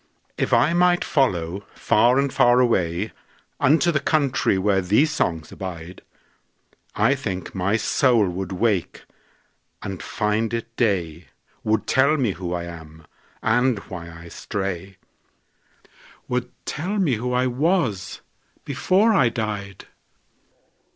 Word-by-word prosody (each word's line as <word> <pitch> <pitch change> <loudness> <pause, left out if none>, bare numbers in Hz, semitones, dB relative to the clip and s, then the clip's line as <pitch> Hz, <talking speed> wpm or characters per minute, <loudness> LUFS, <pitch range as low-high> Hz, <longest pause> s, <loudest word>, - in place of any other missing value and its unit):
If - - -2
I 125 +8 +4
might 175 0 +3
follow 95 - 0
far 120 +4 +3
and 140 -1 +1
far 120 -2 +4
awayUnto 125 - 0
the 140 - +2
country 140 -10 +1
where 95 0 +2
these 110 - +2
songs 80 - -2
abide,I 90 -1 -5
think 95 0 -5
my 100 +3 0
soul 115 -1 +2
would 90 +1 -4
wake 95 -1 -1 0.8
and 95 -3 -5
find 110 +2 -1
it 115 0 -6
day, 90 - -1 0.4
Would 110 -1 0
tell 140 +4 +3
me 125 -7 +1
who 90 -1 -6
I 90 -1 -2
am, 80 -2 -11 0.4
and 125 +2 +2
why 85 -4 -8
I 85 0 -11
stray,—Would 100 +6 -8 0.2
tell 185 +8 -3
me 175 -10 +2
who 125 +3 -3
I 125 +1 +2
was 125 - 0 0.4
before 190 - +2
I 130 - +4
died. 105 -4 -5
110 Hz, 115 wpm, -23 LUFS, 90-130 Hz, 0.8 s, I